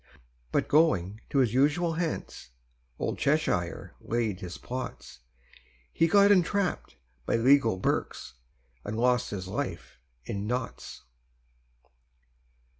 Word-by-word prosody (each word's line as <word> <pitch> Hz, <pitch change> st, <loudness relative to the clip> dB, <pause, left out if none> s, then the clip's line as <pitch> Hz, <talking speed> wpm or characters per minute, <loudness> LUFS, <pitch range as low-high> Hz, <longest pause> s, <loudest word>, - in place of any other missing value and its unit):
But -, -, +1 dB
going 110 Hz, -, +2 dB
to -, -, -1 dB
his 125 Hz, -5 st, +3 dB
usual 150 Hz, +6 st, +2 dB
Hants, 165 Hz, -, -4 dB, 0.5 s
Old -, -, -3 dB
Cheshire 140 Hz, -, 0 dB
laid 110 Hz, -5 st, -2 dB
his 90 Hz, -2 st, -7 dB
plots: 130 Hz, +1 st, -7 dB, 0.7 s
He 165 Hz, -, +3 dB
got 200 Hz, +4 st, +5 dB
entrapp'd 195 Hz, 0 st, +1 dB, 0.3 s
by -, -, +2 dB
legal 115 Hz, -3 st, +4 dB
Berks, 90 Hz, -, -2 dB, 0.5 s
And 110 Hz, -, -4 dB
lost 125 Hz, +1 st, +2 dB
his 95 Hz, -3 st, -5 dB
life 95 Hz, -, -5 dB, 0.3 s
in 100 Hz, +1 st, -4 dB
Notts. 125 Hz, 0 st, -5 dB
125 Hz, 110 wpm, -28 LUFS, 105-160 Hz, 0.7 s, got